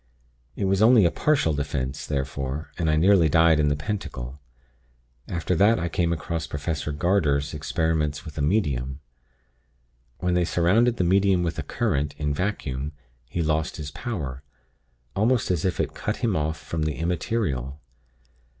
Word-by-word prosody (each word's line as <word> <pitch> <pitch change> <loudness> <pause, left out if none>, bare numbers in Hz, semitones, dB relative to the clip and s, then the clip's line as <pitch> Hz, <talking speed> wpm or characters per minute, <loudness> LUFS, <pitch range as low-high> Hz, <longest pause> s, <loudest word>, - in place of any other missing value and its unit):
It 100 - -1
was 95 +1 +2
only 110 -3 +7
a 85 - +3
partial 140 - +2
'defense' 70 -1 -3
therefore, 70 +1 -3
and 80 -2 +1
I 75 - +3
nearly 85 0 +5
died 80 +1 +5
in 75 - +3
the 75 - +2
pentacle. 70 - -5 0.9
After 85 +1 -1
that 105 +6 +4
I 85 - -2
came 85 +1 0
across 85 0 -3
Professor 75 +1 -3
Garder's 75 -3 +1
'Experiments 75 0 -1
with 80 - -9
a 75 - -2
Medium.' 70 - 0 1.2
When 90 0 0
they 90 0 +3
surrounded 105 +9 +3
the - - +1
Medium 95 0 +3
with 85 -1 -2
a - - 0
current, 75 +1 -1
in 75 -1 -1
vacuum, 75 -6 -3 0.3
he 85 +7 -2
lost 80 0 0
his 75 -1 -6
power 75 - -5 0.7
almost 110 +1 +2
as 85 -2 0
if 90 - 0
it - - -1
cut 105 - -3
him 115 -6 0
off 80 0 -1
from 80 - -4
the 75 -1 0
Immaterial. 85 - -2
80 Hz, 160 wpm, -25 LUFS, 75-95 Hz, 1.2 s, only